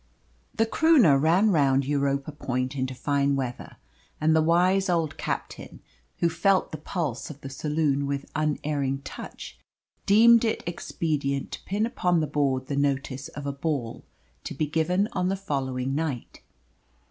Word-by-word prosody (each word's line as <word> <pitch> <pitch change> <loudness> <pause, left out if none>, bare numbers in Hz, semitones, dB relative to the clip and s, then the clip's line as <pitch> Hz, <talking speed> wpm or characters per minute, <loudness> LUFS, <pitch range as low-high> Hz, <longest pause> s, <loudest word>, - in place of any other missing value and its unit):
The 225 - +3
Croonah 235 - +5
ran 180 +7 +4
round 140 -5 +3
Europa 140 0 0
Point 130 -2 -3
into 130 -1 -2
fine 140 +1 +1
weather, 130 -3 -5 0.4
and 155 +1 +3
the 160 - +4
wise 180 +4 +3
old 165 -4 0
captain - - -5 0.4
who 170 - +2
felt 185 +4 +1
the 155 - -6
pulse 170 -6 -3
of 145 -2 -10
the 135 - -7
saloon 145 0 0
with 140 0 -3
unerring 145 -3 -1
touch 60 - -9 0.5
deemed 230 +3 +7
it 225 - -1
expedient 150 -5 -2
to - - -7
pin 205 +3 0
upon 180 -7 +1
the 155 - +1
board 135 -3 0
the 140 - -3
notice 140 -1 -1
of 145 - -8
a 140 - -2
ball 140 -5 -3 0.4
to - - -6
be 155 - 0
given 165 +6 +1
on 180 0 0
the 195 - 0
following 135 -8 -2
night. 145 -5 -4
150 Hz, 155 wpm, -26 LUFS, 140-175 Hz, 0.5 s, deemed